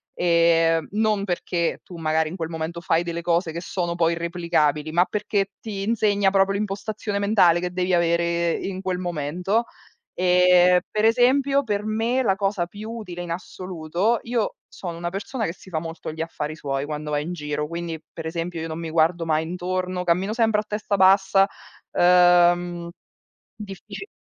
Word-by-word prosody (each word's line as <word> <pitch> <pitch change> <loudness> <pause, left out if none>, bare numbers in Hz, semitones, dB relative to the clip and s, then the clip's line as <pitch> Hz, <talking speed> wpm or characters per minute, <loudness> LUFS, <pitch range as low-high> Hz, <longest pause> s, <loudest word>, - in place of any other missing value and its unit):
,ehm, 165 -2 +3
non 215 -2 +1
perché 175 -2 -1
tu 175 - -11
magari 160 -1 0
in 180 - -7
quel 165 -3 -4
momento 165 +1 -4
fai 165 0 +1
delle 170 0 -4
cose 170 -1 0
che 170 - -4
sono 175 -1 -2
poi 170 -1 +2
irreplicabili, 165 -3 0
ma 175 +3 +3
perché 205 -1 -1
ti 200 -3 -5
insegna 205 -2 +2
proprio 195 0 +3
l'impostazione 205 0 -3
mentale 200 -5 +4
che 180 - -2
devi 180 0 -1
avere 170 0 +2
in 190 -1 -4
quel 185 -1 -2
momento. 180 +6 -1 0.6
Ehm, 180 0 +5
per 215 0 +1
esempio 265 +4 +3
per 210 -2 -2
me 225 +4 0
la 195 -4 +2
cosa 195 -3 -1
più 210 +4 -8
utile 185 -7 -7
in 175 -1 -6
assoluto 180 +4 -2
io 235 -2 -1
sono 175 -3 -7
una 175 0 -3
persona 215 +5 -4
che 165 - -3
si 185 - -16
fa 160 -3 -2
molto 165 0 -6
gli 160 - -11
affari 155 -2 -4
suoi 135 -1 -2
quando 150 0 -5
va 145 - +1
in 155 +4 -4
giro, 150 -2 -3
quindi 170 -1 -5
per 165 - -7
esempio 165 +1 -4
io 165 - -4
non 160 0 -5
mi 165 - -4
guardo 165 +1 +2
mai 155 0 +1
intorno, 180 +1 -3
cammino 180 +4 +1
sempre 225 -2 +2
a - - -14
testa 210 -1 -2
bassa, 195 0 +5 0.4
ehm, 175 -1 +4 0.7
diffici 205 - -9
180 Hz, 175 wpm, -23 LUFS, 165-200 Hz, 0.7 s, Ehm